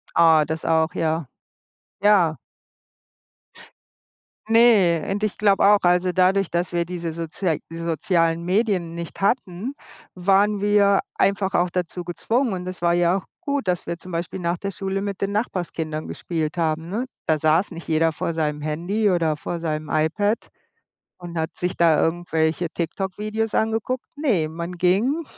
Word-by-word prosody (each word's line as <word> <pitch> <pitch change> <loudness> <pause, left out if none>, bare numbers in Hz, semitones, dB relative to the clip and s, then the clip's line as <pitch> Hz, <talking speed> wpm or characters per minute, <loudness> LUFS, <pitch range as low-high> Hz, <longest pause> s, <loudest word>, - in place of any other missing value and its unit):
Ah, 160 -2 +6
das 160 +2 -4
auch, 160 +1 +2
ja. 160 -4 -1 0.7
Ja. 190 -7 +4 2.1
Ne, 215 -8 +4
und 200 +2 -2
ich 215 - -2
glaube 200 -2 +3
auch, 205 0 +6
also 180 +1 +3
dadurch, 185 +1 +2
dass 175 +1 -1
wir 170 0 +1
diese 170 -2 -4
sozia 165 +1 -2
die 165 - -8
sozialen 165 0 0
Medien 185 -3 0
nicht 170 -1 -7
hatten, 200 +2 -1 0.4
waren 195 +3 +2
wir 205 -1 +4 0.2
einfach 195 0 +1
auch 175 +1 +3
dazu 180 0 -3
gezwungen 225 +7 -1
und 180 -1 -5
es 185 0 -6
war 170 0 +2
ja 175 +1 +3
auch - - -10 0.2
gut, 280 - -2
dass 180 -1 -1
wir 170 0 -4
zum 185 0 -11
Beispiel 170 +3 -4
nach 170 0 0
der 200 - -4
Schule 195 0 -3
mit 200 -1 -4
den 200 0 -1
Nachbarskindern 170 -7 -3
gespielt 160 -2 -3
haben, 160 -1 -1
ne? 225 +8 -2 0.2
Da 155 -1 +2
saß 160 +6 +2
nicht 170 0 -9
jeder 160 0 +2
vor 165 - -3
seinem 150 -2 -2
Handy 175 +8 0
oder 165 -4 +1
vor 170 +3 -5
seinem 155 -2 -3
iPad 190 +8 0 0.7
und 175 -1 -7
hat 160 0 -3
sich 180 0 -2
da 165 -3 +4
irgendwelche 165 0 0
TikTok-Videos 210 +6 -3
angeguckt. 225 +3 -1
Ne, 235 - +1
man 170 +3 -6
ging 200 - +1
175 Hz, 160 wpm, -23 LUFS, 165-200 Hz, 2.1 s, Ah